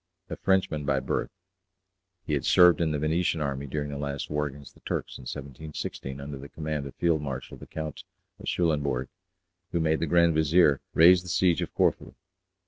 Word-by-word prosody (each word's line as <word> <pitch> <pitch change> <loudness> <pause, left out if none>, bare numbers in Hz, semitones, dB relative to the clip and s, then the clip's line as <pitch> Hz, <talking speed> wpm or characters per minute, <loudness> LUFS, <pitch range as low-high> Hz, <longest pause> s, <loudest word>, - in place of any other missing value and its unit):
A - - -2
Frenchman 95 -6 +1
by 70 -1 +1
birth, 65 - -2 1.0
he 75 - -2
had 70 - 0
served 90 -2 +6
in 80 - +2
the 75 - -1
Venetian 80 +3 0
army 70 -1 -3
during 75 +1 -3
the 70 - -5
last 70 0 -4
war 75 0 0
against 70 0 -11
the - - -21
Turks - - -4
in 65 - -8
1716, 70 -1 -6
under 70 0 -7
the 70 +2 -10
command 75 -2 -4
of 70 - -11
Field 85 -3 +1
Marshal 70 -2 -5
the - - -12
Count 80 -2 -6 0.4
of - - -10
Schulenbourg, 70 -6 0 0.6
who 85 - 0
made 80 -1 +1
the 85 - -1
Grand 85 +1 +4
Vizier 80 -2 +4
raise 85 +2 +7
the 90 - -10
siege 85 0 +2
of - - -3
Corfu. - - +1
75 Hz, 190 wpm, -27 LUFS, 70-85 Hz, 1.0 s, raise